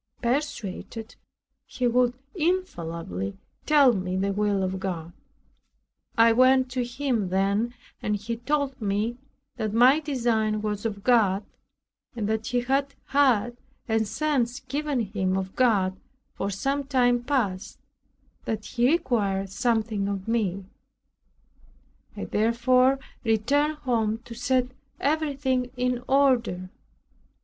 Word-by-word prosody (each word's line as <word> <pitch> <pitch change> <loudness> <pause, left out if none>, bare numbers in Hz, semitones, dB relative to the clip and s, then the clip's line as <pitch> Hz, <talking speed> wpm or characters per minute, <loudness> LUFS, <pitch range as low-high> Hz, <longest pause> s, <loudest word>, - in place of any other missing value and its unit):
Persuaded, 235 -4 -3 0.5
he 250 - -3
would 245 0 +3 0.2
infallibly 170 - -2 0.3
tell 285 -5 +6
me 185 -2 -2
the 195 +1 0
will 205 -1 +1
of 185 0 -2
God. 175 -3 -4 1.0
I 230 0 +7
went 255 +2 +4
to 250 0 -1
him 240 -5 -1
then, 200 +5 0 0.3
and 210 - 0
he 220 +3 -4
told 275 +1 -1
me 210 +3 -1 0.4
that 215 -2 -2
my 255 +6 +6
design 230 -7 0
was 210 +1 -1
of 200 -2 -7
God, 210 -5 +3 0.7
and 215 -3 -2
that 220 0 -1
he 245 0 +1
had 275 +3 0
had 245 -4 +3 0.3
a 225 -1 +2
sense 250 +2 -1
given 280 0 -2
him 190 -3 -1
of 190 0 -4
God 200 -7 +2 0.4
for 200 - -3
some 275 +9 -1
time 245 -3 +2
past, 235 -9 -1 0.7
that 215 -1 -3
he 245 -1 +1
required 200 - 0
something 220 -2 0
of 200 -1 -4
me. 200 -5 -1 1.5
I - - -4
therefore 250 +4 +3 0.3
returned 275 +7 +2
home 225 -6 0
to 235 - -8
set 250 +1 +1 0.3
everything 275 -4 0
in 250 0 0
order. 240 -10 +2
235 Hz, 120 wpm, -26 LUFS, 200-260 Hz, 1.5 s, I